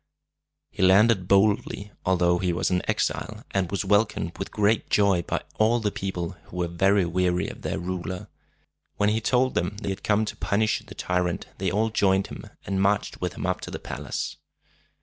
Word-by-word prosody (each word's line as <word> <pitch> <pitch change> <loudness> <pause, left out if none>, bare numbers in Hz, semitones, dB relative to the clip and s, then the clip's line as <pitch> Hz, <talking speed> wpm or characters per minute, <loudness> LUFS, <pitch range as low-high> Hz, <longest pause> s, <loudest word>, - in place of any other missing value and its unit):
He - - -6
landed 95 +1 +5
boldly, 100 +1 +2 0.2
although 90 -1 +3
he 90 -1 +1
was 85 - 0
an 90 0 +2
exile, - - -1
and 95 -3 0
was 100 - -2
welcomed 100 -5 +1
with 95 - -4
great 105 +1 +1
joy 100 -4 +3
by - - -3 0.2
all 115 +2 +4
the 105 -2 -1
people, 90 -4 -3
who 90 - -10
were 90 -1 0
very 95 +3 +3
weary 90 +1 +1
of - - -8
their - - -2
ruler. 90 +1 -4 0.7
When 105 0 +2
he 110 +1 0
told 130 +3 +2
them 90 +4 -1
that 105 - -7
he 100 - 0
had 95 +1 -6
come 105 +1 +2
to - - -5
punish 110 +2 +1
the - - -13
tyrant, 90 -1 -1
they 95 -1 0
all 110 +5 +1
joined 95 -2 +2
him, - - -9 0.2
and 95 -1 -1
marched 100 +1 +1
with 90 -3 -2
him - - -4
up 90 0 -1
to - - -6
the - - -4
palace. - - -5
95 Hz, 195 wpm, -26 LUFS, 90-105 Hz, 0.7 s, landed